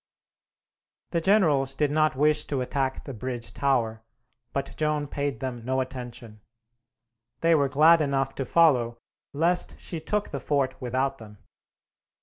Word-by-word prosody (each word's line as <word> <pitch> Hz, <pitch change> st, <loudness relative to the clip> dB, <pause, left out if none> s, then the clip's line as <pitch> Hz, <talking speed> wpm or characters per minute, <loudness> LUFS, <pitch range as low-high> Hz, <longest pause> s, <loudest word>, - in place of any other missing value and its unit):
The 170 Hz, -, 0 dB
generals 155 Hz, -9 st, +3 dB
did 150 Hz, 0 st, +1 dB
not 155 Hz, 0 st, +2 dB
wish 150 Hz, +2 st, +2 dB
to 140 Hz, -3 st, -2 dB
attack 135 Hz, +1 st, -2 dB
the 135 Hz, -, -7 dB
bridge 120 Hz, 0 st, -6 dB
tower, 120 Hz, -5 st, 0 dB, 0.5 s
but 140 Hz, 0 st, -4 dB
Joan 150 Hz, -1 st, 0 dB
paid 140 Hz, -1 st, -3 dB
them 125 Hz, -3 st, -4 dB
no 130 Hz, +2 st, 0 dB
attention. 120 Hz, -4 st, -7 dB, 1.0 s
They 165 Hz, 0 st, +4 dB
were 140 Hz, -3 st, +3 dB
glad 155 Hz, +4 st, +6 dB
enough 135 Hz, -2 st, 0 dB
to 135 Hz, -, -2 dB
follow, 125 Hz, -8 st, +3 dB, 0.3 s
lest 170 Hz, +5 st, +1 dB
she 170 Hz, -, -5 dB
took 205 Hz, +6 st, -2 dB
the 140 Hz, -, -3 dB
fort 135 Hz, -3 st, 0 dB
without 130 Hz, +2 st, -1 dB
them. 105 Hz, -2 st, -12 dB
135 Hz, 140 wpm, -26 LUFS, 130-150 Hz, 1.0 s, glad